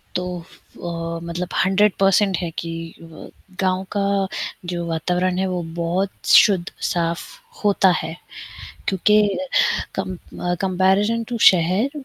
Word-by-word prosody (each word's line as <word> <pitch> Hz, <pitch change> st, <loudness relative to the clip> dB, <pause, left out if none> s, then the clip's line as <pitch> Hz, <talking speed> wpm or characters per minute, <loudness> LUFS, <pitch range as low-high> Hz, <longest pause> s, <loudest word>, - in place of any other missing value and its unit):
तो 180 Hz, 0 st, -2 dB, 0.5 s
अ, 170 Hz, -1 st, -4 dB
मतलब 170 Hz, +1 st, -4 dB, 0.2 s
100% 195 Hz, 0 st, +3 dB
है 175 Hz, -1 st, -3 dB
कि 165 Hz, -, -5 dB, 0.3 s
व 165 Hz, -1 st, -12 dB, 0.3 s
गाँव 185 Hz, 0 st, +1 dB
का 200 Hz, -1 st, +1 dB, 0.4 s
जो 170 Hz, -1 st, -3 dB
वातावरण 180 Hz, +3 st, 0 dB
है, 190 Hz, -, 0 dB
वो 180 Hz, -1 st, -2 dB, 0.2 s
बहुत 185 Hz, +4 st, -2 dB
शुद्ध 190 Hz, -4 st, +6 dB, 0.3 s
साफ 170 Hz, -1 st, -1 dB, 0.4 s
होता 200 Hz, -2 st, +4 dB
है, 160 Hz, +1 st, -6 dB, 0.7 s
क्योंकि 210 Hz, +3 st, +4 dB, 0.7 s
कम 190 Hz, -1 st, -3 dB
अ, 175 Hz, +1 st, -4 dB
कंपैरिज़न 195 Hz, +4 st, +2 dB
टू 240 Hz, -, -3 dB
शहर, 185 Hz, +8 st, +2 dB
185 Hz, 120 wpm, -21 LUFS, 170-195 Hz, 0.7 s, शुद्ध